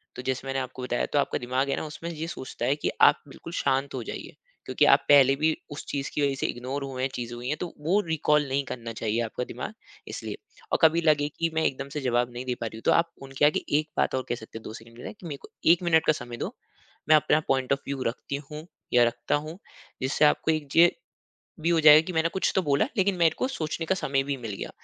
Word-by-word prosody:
तो - - -6
जैसे 130 0 -2
मैंने 135 0 -1
आपको 130 0 -6
बताया 120 -1 -1
तो 145 - +4
आपका - - 0
दिमाग़ 130 +3 -1
है - - +1
ना - - -3
उसमें 165 +2 -7
ये 160 0 -5
सोचता 130 -6 -5
है 135 +3 +2
कि 145 - -2
आप - - +6
बिल्कुल - - -10
शांत 135 +1 0
हो 125 - -4
जाइए। - - -7 0.3
क्योंकि - - +2
आप - - +7
पहले 135 -1 +7
भी 155 +1 +2 0.2
उस 145 - -6
चीज़ 140 -1 -3
की 150 - -1
वजह 140 -1 +1
से - - -3
इग्नोर 130 +3 -4
हुए 130 -2 -5
हैं 135 - +1
चीज़ें 120 -1 -5
हुई 120 +2 -5
है 150 - +1
तो 180 - -1 0.2
वो 195 +5 +3
रिकॉल 150 -2 +2
नहीं 135 +1 0
करना 115 -3 -6
चाहिए 110 +1 -1
आपका 115 +2 -4
दिमाग 125 - -6 0.3
इसलिए। - - -6 0.3
और - - +2
कभी 165 +1 +5
लगे 150 -3 +3
कि 165 0 +1
मैं 160 - +1
एकदम 140 +1 -2
से 150 +1 -4
जवाब 120 -1 +1
नहीं 125 +1 -6
दे 125 -1 -1
पा - - -1
रही 110 - -8
हूँ 115 - -10
तो - - +5
आप 165 0 +3
उनके 135 +2 0
आगे 150 - +3 0.2
एक 155 - -5
बात - - +1
और 130 - -1
कह 120 - 0
सकते 110 0 -10
हैं - - -19
2 110 - -7
सेकंड 115 +1 -12
के - - -11
लिए - - -7
मेरे 150 -5 -5
को - - -13 0.2
1 175 +1 +3
मिनिट 160 -2 +3
का 155 - +6
समय 120 -4 -7
दो - - -4 0.6
मैं 155 - +8
अपना 155 0 +3
पॉइंट 130 0 +2
ऑफ़ 140 - -1
व्यू 140 -1 -3
रखती 130 +4 -3
हूँ 150 +1 -7 0.3
या 120 - +6
रखता 120 +4 -1
हूँ, 155 +5 -5 0.4
जिससे 130 +3 +2
आपको 150 +2 +3
एक 155 -2 -2
च - - -7
जो 165 - +8
ये 175 - +1 0.5
भी 170 - +2
हो 165 -1 +3
जाएगा 150 0 +9
कि 185 - -4
मैंने 160 0 +2
कुछ 190 - +1
तो 190 - +4
बोला 145 +5 +2
लेकिन 195 0 +2
मेरे 165 -3 +3
को 255 - +1
सोचने 165 - -3
का 190 - +2
समय 135 -5 0
भी 140 0 -2
मिल 115 -4 -6
गया। - - -5
140 Hz, 270 wpm, -26 LUFS, 125-155 Hz, 0.6 s, जाएगा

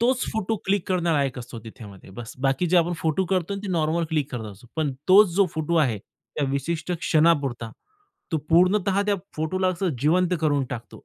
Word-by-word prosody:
तोच 255 +2 +2
photo 220 0 -1
click 195 -1 0
करणारा 170 -5 +1
एक 135 -1 -4
असतो 120 -1 -8
त्याच्यामध्ये. 105 -4 -12
बस्स, 115 +4 -9
बाकी 135 +6 +1
जे 180 - +3
आपण 170 +1 +1
फोटो 160 +4 +1
करतो 185 +1 -1
ना 200 - -5
ते - - -4
नॉर्मल 165 0 +1
क्लिक 150 -3 -1
करत 115 -3 -4
असतो. 100 +5 -17
पण 150 -4 0 0.2
तोच 200 +2 +7
जो 200 0 +4
फोटो 160 +2 -1
आहे 115 -5 -1
त्या 145 +8 -7
विशिष्ट 160 +5 -2
क्षणापुरता, 145 -9 +2 0.6
तो 160 - +2
पूर्णतः 190 +3 +3
त्या 205 - +2 0.2
फोटोला 185 +4 0
असं 185 +1 -1
जिवंत 175 +5 +2
करून 145 -3 +1
टाकतो. 120 -3 -8
160 Hz, 190 wpm, -24 LUFS, 135-185 Hz, 0.6 s, तोच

